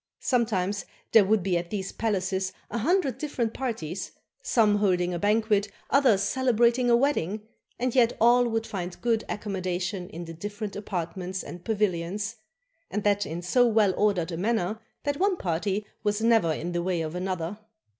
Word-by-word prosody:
Sometimes 205 -6 +1 0.3
there 220 - +8
would 210 -1 +2
be 180 -2 +1
at 170 0 -7
these 195 -2 -3
palaces 190 -3 -1 0.2
a 235 - -1
hundred 330 - +1
different 245 -7 -2
parties; 195 -9 -4 0.3
some 210 -3 +3
holding 180 -3 +1
a 175 - -2
banquet, 210 0 +2 0.2
others 255 -8 +4
celebrating 240 +1 +2
a 235 - +6
wedding; 215 - 0 0.3
and 250 0 -1
yet 245 -3 +3
all 240 +2 +5
would 225 -1 -1
find 180 -3 -5
good 230 -2 +1
accommodation 185 -2 -3
in 170 +2 -7
the 165 - -8
dif 205 +5 -7
ferent 215 -3 -4
apartments 185 -1 -4
and 175 0 -9
pavilions, 205 +1 -1 0.5
and 210 0 -2
that 205 -1 +2
in 170 +3 -5
so 245 +7 +4
well 215 -4 +3
ordered 185 -5 +1
a 165 - -3
manner 215 +1 0 0.2
that 285 -1 -1
one 385 +1 +2
party 190 - -1 0.2
was 210 0 0
never 225 -7 +4
in 170 +3 -3
the 175 0 -1
way 175 -1 0
of 155 -1 -4
another. 180 +1 -3
205 Hz, 170 wpm, -27 LUFS, 180-230 Hz, 0.5 s, there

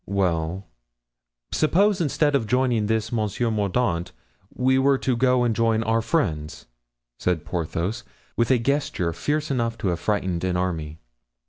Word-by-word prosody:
"Well, 90 -1 -1 0.9
suppose 195 +6 +2
instead 145 -1 +1
of 115 -6 +1
joining 125 -3 +1
this 110 +1 0
Monsieur 115 +1 -1
Mordaunt 100 -4 0 0.4
we 130 +1 +2
were 135 0 +4
to 130 -1 0
go 125 +1 +3
and 115 -2 +1
join 115 0 +2
our 115 0 +1
friends?" 80 - -2 0.5
said 90 -4 -1
Porthos, 85 +6 -3 0.3
with 115 - +1
a 130 - +5
gesture 115 - -1
fierce 150 - -1
enough 115 -3 -1
to 100 - -1
have 85 -2 -1
frightened 95 -5 -1
an 90 -1 0
army. 80 -4 -2
115 Hz, 145 wpm, -24 LUFS, 90-130 Hz, 0.9 s, a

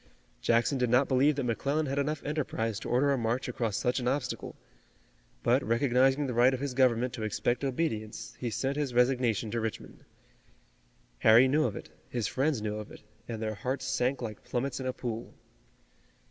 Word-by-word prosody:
Jackson 120 +4 +2
did 125 -1 +1
not 125 +3 +4
believe 140 +3 +3
that 140 - -2
McClellan 140 +6 0
had 140 0 -1
enough 150 +2 -1
enterprise 115 -8 -2
to - - -6
order 135 +4 +3
a 135 - 0
march 120 +3 -1
across 115 -4 -2
such 125 +2 0
an 125 - -2
obstacle, 130 -1 -2 0.9
but - - +3
recognizing 130 +4 +2
the 130 - -2
right 125 +3 +4
of - - -6
his 140 -1 -3
government 125 -1 +2
to 120 - -6
expect 120 +4 -1
obedience, 115 -6 -3
he 120 - -2
sent 130 +6 -2
his 140 -5 -2
resignation 125 -4 +2
to 115 - -1
Richmond. 110 -1 -6 1.2
Harry 115 +4 +7
knew 150 +4 +2
of - - -2
it, - - -8 0.2
his 120 -3 -2
friends 135 0 0
knew 105 0 -2
of 105 -1 -8
it, - - -13 0.2
and 115 -2 -4
their 110 0 -1
hearts 130 +6 -3
sank 130 0 0
like 110 -2 -6
plummets 130 +2 -2
in 130 - -3
a 130 - -1
pool. 120 -3 -5
125 Hz, 190 wpm, -30 LUFS, 115-135 Hz, 1.2 s, Harry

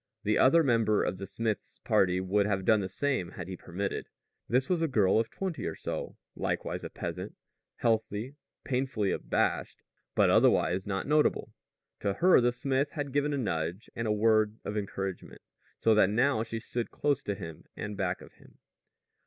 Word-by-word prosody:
The - - +2
other 165 +5 +6
member 115 -5 +3
of 90 - -2
the 100 - -5
smith's 110 +2 -3
party 90 -1 +2
would 100 +2 +1
have 95 -2 -1
done 110 -1 +5
the 95 -2 -3
same 135 -4 -1
had 90 - -7
he 95 - -5
permitted. 90 +3 -4 0.4
This 130 +3 +2
was 180 -3 +1
a 165 - +2
girl 105 -7 +3
of 115 - -1
twenty 185 -4 -4
or - - -4
so, - - -5 0.2
likewise - - -2
a - - -5
peasant, - - -6 0.4
healthy, 115 +2 0 0.3
painfully 125 -6 0
abashed, - - -1 0.3
but - - +4
otherwise 95 +2 +3
not 95 -1 -2
notable. 150 +1 +2 0.5
To 100 -1 0
her 180 - +5
the 120 0 +3
smith 135 +3 -1
had 145 -3 -4
given 145 +1 +1
a 145 - 0
nudge 90 -5 -3
and 115 -1 -2
a - - +1
word 110 0 +3
of 105 - -3
encouragement, 95 -2 -4 0.4
so 110 - +4
that 105 -3 +5
now 120 +3 +2
she 115 0 -4
stood 120 +1 -4
close 145 -2 0
to 100 -6 -3
him 80 -4 -9
and 105 0 -4
back 95 -2 -2
of - - -14
him. - - -21
110 Hz, 180 wpm, -30 LUFS, 95-130 Hz, 0.5 s, other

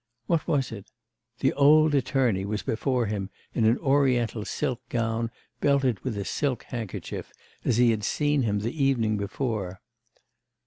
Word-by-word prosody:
What 165 +3 0
was 135 -5 +1
it? 100 -3 -9 0.5
the - - +3
old 150 +2 +5
attorney 130 -8 +1
was 105 +1 -3
before 125 +1 0
him 100 -2 -3 0.2
in 115 - +2
an 115 +2 +4
Oriental 130 -6 +2
silk 130 -5 -2
gown 115 0 -1 0.3
belted 135 -6 +2
with 125 -5 -4
a 100 - -3
silk 130 +1 -1
handkerchief, 115 -6 -6 0.3
as 120 - +1
he 120 -1 +5
had 110 -2 -2
seen 145 +5 +1
him 105 -4 0
the 125 +7 -2
evening 115 -6 +2
before.... 100 -2 -3
120 Hz, 150 wpm, -26 LUFS, 110-135 Hz, 0.5 s, old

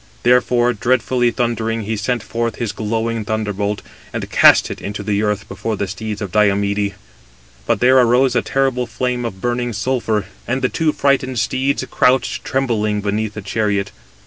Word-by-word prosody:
Therefore, 125 0 +3
dreadfully 120 +2 +1
thundering 115 -2 -1
he 110 +2 -2
sent 115 +2 -1
forth 115 +1 -2
his 115 -4 -3
glowing 115 +1 -2
thunderbolt, 105 -1 -2 0.3
and - - -4
cast - - +6
it - - -7
into 100 +1 -5
the 100 0 0
earth 105 -1 -1
before 105 +2 -4
the 100 - -2
steeds 105 +3 -5
of 95 - -5
Diomede: 100 -1 +1 0.7
but - - +1
there 130 +1 +6
arose 125 +1 +3
a 120 - +3
terrible 130 -2 0
flame 125 +1 -2
of 95 -5 -6
burning 120 0 -1
sulphur, 110 -2 -1 0.2
and 130 +2 -1
the 125 - +3
two 160 -2 +1
frightened 135 -3 +1
steeds 130 +5 0
crouched 130 +1 +2
trembling 110 -6 0
beneath 105 +1 -2
the 105 - -6
chariot. 105 -1 -1
115 Hz, 165 wpm, -19 LUFS, 105-125 Hz, 0.7 s, cast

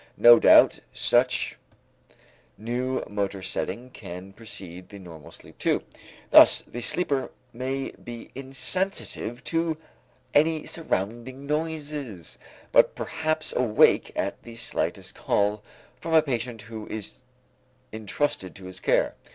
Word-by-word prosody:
No 120 0 +9
doubt, - - +7
such - - +1 1.0
new 125 +4 -2
motor 100 -2 -3
setting 125 +6 -4
can 90 -2 -9
precede 95 -5 -10
the 100 - -10
normal 85 -6 -11
sleep - - -16
too; - - +1 0.5
thus - - +8
the 120 - -7
sleeper 140 +1 0 0.2
may 130 +3 -3
be 120 -1 -10
insensitive 135 - -3
to 165 +3 0 0.6
any 155 +1 +3
surrounding 130 - -3
noises, 150 - -4 0.3
but - - +5
perhaps 155 0 -1
awake 120 -4 +4
at - - -2
the 115 -1 -11
slightest 115 0 -3
call 105 +1 0 0.4
from 165 +3 -1
a 160 - +7
patient 120 -5 -3
who 110 0 -8
is 110 -2 -6 0.7
intrusted 110 -2 -2
to 95 - -11
his 90 0 -8
care. - - +2
120 Hz, 120 wpm, -26 LUFS, 105-145 Hz, 1.0 s, No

